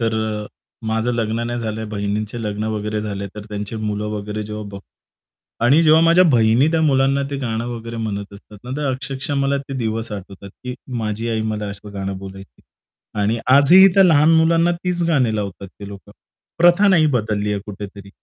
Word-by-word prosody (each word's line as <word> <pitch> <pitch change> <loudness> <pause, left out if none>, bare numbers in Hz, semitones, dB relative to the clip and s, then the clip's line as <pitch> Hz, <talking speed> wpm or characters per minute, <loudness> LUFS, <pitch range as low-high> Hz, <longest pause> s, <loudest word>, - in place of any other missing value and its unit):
तर 115 -1 0 0.3
अ, - - -9 0.4
माझं 110 +2 0
लग्न 115 0 -1
नाही 120 0 -3
झालं 110 -1 -4
आहे. 110 - -5
बहिणींचे 105 +2 -3
लग्न 105 0 -3
वगैरे 105 0 -3
झाले. 100 -2 -4
तर 105 -1 -8
त्यांची 105 +1 -5
मुलं 105 -1 -3
वगैरे 105 0 -4
जेव्हा 105 0 -6
बघतो 100 -1 -9 0.8
आणि 140 +7 +5
जेव्हा 160 0 +6
माझ्या 170 +2 +5
बहिणी 115 +3 +4
त्या 165 - +2
मुलांना 135 -1 +2
ते 140 - -3
गाणं 115 -3 -3
वगैरे 115 -1 -6
म्हणत 100 -3 -4
असतात 100 +1 -14
ना, 125 - -8
तर 150 -1 -2
अक्षरशः 135 +2 -4
मला 140 0 +1
ते - - -5
दिवस 115 -1 -3
आठवतात, 100 0 -9
की 125 0 -4 0.2
माझी 110 +1 -3
आई 110 -1 -1
मला 105 0 -4
असं 100 +1 -10
गाणं 95 0 -4
बोलायची. 95 0 -11 0.6
आणि 110 +3 +1 0.2
आजही 175 +8 +8
त्या 195 - +7
लहान 155 -3 +5
मुलांना 165 +1 +3
तीच 175 0 -2
गाणी 130 -9 +2
लावतात 100 -1 -5
ते 100 +1 -11
लोकं. 100 -1 -12 0.5
प्रथा 175 +4 +5
नाही 170 -5 +5
बदलली 105 -2 -1
आहे 100 - -2
कुठेतरी. 100 -1 -9
110 Hz, 190 wpm, -20 LUFS, 105-140 Hz, 0.8 s, आजही